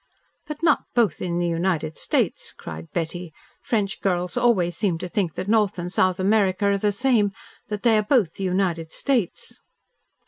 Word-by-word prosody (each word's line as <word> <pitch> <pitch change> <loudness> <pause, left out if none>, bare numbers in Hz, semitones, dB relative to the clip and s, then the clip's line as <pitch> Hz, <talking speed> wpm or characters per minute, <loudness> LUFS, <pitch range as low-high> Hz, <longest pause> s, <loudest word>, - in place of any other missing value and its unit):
"But 300 +1 -7
not 320 -3 +3
both 225 -9 +2
in 175 -1 -2
the 175 - 0
United 165 -2 -1
States," - - -1
cried 80 0 -9
Betty. 175 +1 -3 0.3
"French 205 -4 -1
girls 180 -2 0
always 225 -8 +2
seem 195 -6 0
to 180 - -5
think 180 -4 -1
that - - -4
North 210 -2 +2
and 175 +1 -5
South 185 0 +2
America 200 0 +2
are 200 0 +3
the 210 +1 +2
same, 215 -2 +2 0.4
that 210 -2 -5
they 225 -3 +5
are - - +3
both 210 - +2
the 195 - -6
United 180 -3 -1
States." 245 -10 -2
190 Hz, 175 wpm, -24 LUFS, 175-215 Hz, 0.4 s, they